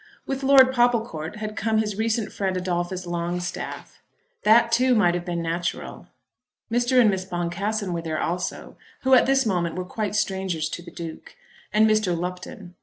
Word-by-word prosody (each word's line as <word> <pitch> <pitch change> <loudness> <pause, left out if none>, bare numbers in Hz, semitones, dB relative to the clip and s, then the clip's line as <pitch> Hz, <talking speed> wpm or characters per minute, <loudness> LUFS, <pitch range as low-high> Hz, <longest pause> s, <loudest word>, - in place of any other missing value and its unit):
With 270 0 -3
Lord 265 -1 +6
Popplecourt 230 -9 0
had 215 0 -5
come 220 +1 0
his 210 -2 0
recent 220 0 -1
friend 190 -2 -1
Adolphus 180 0 -2
Longstaff. 175 +1 -4 0.4
That 230 +2 +5
too 250 +1 +3
might 175 -6 +4
have 175 0 -3
been 170 -2 -3
natural. 170 +1 -4 0.6
Mr. 245 +2 +3
and 235 - +6
Miss 190 -1 -2
Boncassen 185 +3 -2
were 170 - -2
there 160 -2 -3
also, 180 +1 -3 0.3
who 265 0 +3
at 255 - +6
this 270 -1 +3
moment 175 -5 0
were 185 0 -4
quite 210 +2 -3
strangers 190 -6 -1
to 175 - -6
the 175 - -11
Duke; 165 -2 -9 0.4
and 215 +1 +4
Mr. 215 -5 +2
Lupton. 180 +2 -6
190 Hz, 170 wpm, -24 LUFS, 175-225 Hz, 0.6 s, Lord